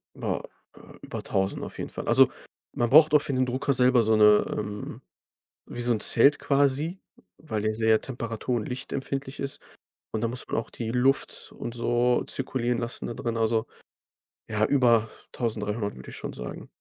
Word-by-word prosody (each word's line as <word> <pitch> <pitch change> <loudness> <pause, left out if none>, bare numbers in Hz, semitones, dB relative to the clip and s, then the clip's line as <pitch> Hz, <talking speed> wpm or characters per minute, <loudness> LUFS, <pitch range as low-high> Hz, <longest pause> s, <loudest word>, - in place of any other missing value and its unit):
Boah, - - -3 0.3
äh, - - -16 0.2
über - - -7
1.000 95 0 -1
auf - - -7
jeden - - -5
Fall. - - -7
Also, - - +6 0.4
man 120 - 0
braucht 155 +3 +7
auch 150 - +6
für 145 -2 -1
den 130 0 +2
Drucker 130 +2 0
selber 125 -1 +4
so 110 0 +3
'ne, 105 -1 +6
ähm 105 0 -5 0.7
wie 120 - -4
so 120 - +1
'n 110 - -1
Zelt 140 +5 +4
quasi, 145 +6 +1 0.4
weil 110 -9 -4
der 110 0 0
sehr 110 0 +3
temperatur 120 -1 -4
und 110 - -2
lichtempfindlich 135 +1 -4
ist, 140 0 -5 0.5
und 110 - -2
da 115 - +1
muss 125 +2 -4
man - - -2
auch 115 - -3
die 115 -1 -5
Luft 130 +3 0
und 120 - -5
so 120 +1 +1
zirkulieren 125 -2 -1
lassen 120 0 -4
da - - -4
drinnen, 115 -1 -3
also 110 0 +1 0.8
ja, 105 -1 +1
über 120 -4 +3 0.2
1.300, 105 - -2
würde 65 - -10
ich - - -9
schon - - -6
sagen. 60 0 -8
120 Hz, 180 wpm, -26 LUFS, 110-130 Hz, 0.8 s, braucht